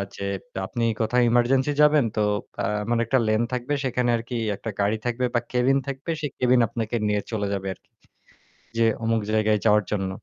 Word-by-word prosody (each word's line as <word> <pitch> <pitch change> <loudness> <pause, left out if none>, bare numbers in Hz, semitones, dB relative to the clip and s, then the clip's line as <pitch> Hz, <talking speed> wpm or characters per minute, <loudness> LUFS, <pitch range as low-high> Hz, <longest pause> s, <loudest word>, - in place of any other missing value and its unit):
যে - - -6 0.4
আপনি 120 +4 -3 0.2
কোথাও 125 +3 +2
এমার্জেন্সি 130 +4 +3
যাবেন 150 -3 +5
তো 105 - +1 0.4
আ - - +1 0.2
এমন 120 +3 0
একটা 130 - +2
লেন 110 +1 +2
থাকবে 125 +3 -2
সেখানে 125 -1 0
আরকি 115 +2 -6 0.2
একটা 110 - -6
গাড়ি 100 +2 +1
থাকবে 120 +1 0
বা - - +5
ক্যাবিন 125 +2 +3
থাকবে 140 +3 -6
সেই 145 - -3
ক্যাবিন 125 0 +3
আপনাকে 115 +1 -3
নিয়ে 105 -1 +1
চলে 105 -3 -1
যাবে 95 -1 -3
আরকি। - - -28 0.9
যে 115 - +4 0.2
অমুক 115 0 +1
জায়গায় 110 -1 +2
যাওয়ার 105 -1 +5
জন্য। 95 -2 -1
115 Hz, 180 wpm, -24 LUFS, 110-125 Hz, 0.9 s, যাবেন